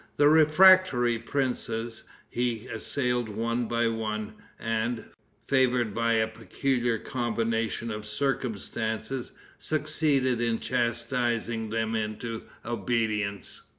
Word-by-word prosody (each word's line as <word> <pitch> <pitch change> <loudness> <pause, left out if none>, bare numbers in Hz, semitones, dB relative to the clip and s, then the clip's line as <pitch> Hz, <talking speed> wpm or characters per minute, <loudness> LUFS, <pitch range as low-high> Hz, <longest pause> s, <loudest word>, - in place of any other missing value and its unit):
The 145 0 +6
refractory 155 -6 +6
princes 120 -3 -2 0.2
he 120 -2 -2
assailed 125 0 -1
one 115 +2 -1
by 115 0 +1
one, 110 -2 -3 0.2
and, 115 +1 -2 0.4
favored 125 -5 +2
by 115 +1 +1
a 110 -1 +3
peculiar 120 +2 -1
combination 115 -1 -1
of 105 0 -6
circumstances, 115 -1 -2 0.3
succeeded 150 -5 +1
in 115 -1 +1
chastising 120 -1 -1
them 115 0 -1
into 110 +1 -3 0.2
obedience. 110 -3 -1
115 Hz, 95 wpm, -28 LUFS, 110-125 Hz, 0.4 s, The